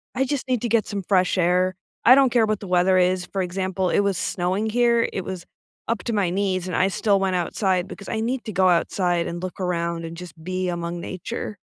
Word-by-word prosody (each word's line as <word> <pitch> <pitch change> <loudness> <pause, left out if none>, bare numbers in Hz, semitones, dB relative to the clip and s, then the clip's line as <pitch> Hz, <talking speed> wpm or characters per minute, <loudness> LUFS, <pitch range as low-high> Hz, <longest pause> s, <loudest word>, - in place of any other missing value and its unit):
I 265 - +1
just 270 0 -3
need 250 -3 0
to 240 - -2
get 225 -1 +2
some 200 -2 -4
fresh 185 0 +2
air. 180 +1 +2 0.3
I 250 - +9
don't 270 -1 +5
care 235 -2 +4
what 215 -1 -1
the 200 - -7
weather 180 +1 +3
is, 180 0 +2
for 195 +2 -3
example, 185 0 -1
it - - +2
was 200 -3 +1
snowing 185 +6 -1
here, 235 0 +3
it 190 - -3
was 185 -2 -6 0.4
up 230 - -1
to 235 - -2
my 200 -4 +1
knees, 185 -1 -1
and 180 - -3
I 190 - +3
still 200 +1 +1
went 190 -1 0
outside 180 +1 0
because 200 - -10
I 220 - -2
need 240 +2 -2
to 215 - -4
go 185 0 +4
outside 175 0 +1
and 170 0 -5
look 185 +1 -6
around 170 -2 -2
and 165 0 -7
just 170 -2 -11
be 185 +1 -2
among 170 0 -3
nature. 190 +3 -6
185 Hz, 235 wpm, -23 LUFS, 180-210 Hz, 0.4 s, I